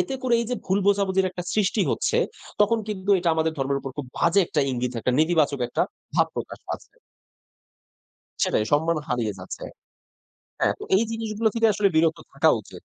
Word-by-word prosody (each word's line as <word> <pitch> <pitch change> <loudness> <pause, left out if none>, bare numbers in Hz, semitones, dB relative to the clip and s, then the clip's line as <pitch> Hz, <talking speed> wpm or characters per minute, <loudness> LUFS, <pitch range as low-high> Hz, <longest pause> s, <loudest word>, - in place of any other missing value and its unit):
এতে 355 -7 -1
করে 245 -2 +2
এই 235 - -2
যে 250 - +1
ভুল 190 +1 +2
বোঝাবুঝির 195 -2 +2
একটা 180 -1 -6
সৃষ্টি 210 0 +1
হচ্ছে, - - 0 0.4
তখন 225 +2 +4
কিন্তু 200 -1 -3
এটা 175 -1 0
আমাদের 160 0 +1
ধর্মের 140 +1 0
উপর 135 - -6
খুব 145 -3 -4
বাজে 170 +4 +4
একটা 150 - 0
ইঙ্গিত, 125 0 -2
একটা 125 - 0
নেতিবাচক 155 -4 +2
একটা - - 0 0.3
ভাব - - +4
প্রকাশ - - -5
পাচ্ছে। - - -6 1.5
সেটাই 105 - +1
সম্মান 160 +3 +3
হারিয়ে 120 -4 -1
যাচ্ছে। 95 - -8 1.0
হ্যাঁ, - - +2
তো - - -7
এই 215 - +4
জিনিসগুলো 225 -1 -1
থেকে 225 -1 +4
আসলে 205 0 +3
বিরত 160 +1 +3 0.2
থাকা 160 +3 +4
উচিত। - - -13
175 Hz, 175 wpm, -24 LUFS, 145-210 Hz, 1.5 s, তখন